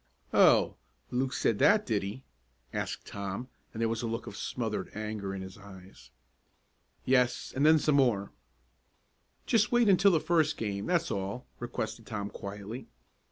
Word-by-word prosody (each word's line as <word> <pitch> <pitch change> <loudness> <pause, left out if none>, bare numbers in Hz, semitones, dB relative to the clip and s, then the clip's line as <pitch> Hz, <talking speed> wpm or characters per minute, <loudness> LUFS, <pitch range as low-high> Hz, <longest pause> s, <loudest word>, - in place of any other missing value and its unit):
"Oh, - - +5 0.3
Luke 130 +1 0
said 110 -5 +1
that, 210 +1 +5
did 110 -4 0
he?" 105 +7 -6 0.5
asked - - -3
Tom, 100 +5 -5 0.2
and 110 - -8
there 115 - +3
was 115 0 -2
a 120 - -2
look 115 0 -3
of - - -8
smothered - - -3
anger 105 -2 -4
in 95 - -5
his 95 +2 -10
eyes. 95 -2 -14 1.0
"Yes, 125 -1 +2
and 135 - +1
then 160 +1 +7
some 150 -1 +2
more." 115 -7 +2 1.1
"Just 215 -2 +3
wait 240 -2 +4
until 195 0 +6
the 170 -4 +3
first 160 -2 +2
game 100 -2 -3
that's 170 -2 +1
all," 100 +6 -3
requested 115 -1 -4
Tom 105 -3 -4
quietly. 105 +5 -7
115 Hz, 160 wpm, -30 LUFS, 100-145 Hz, 1.1 s, then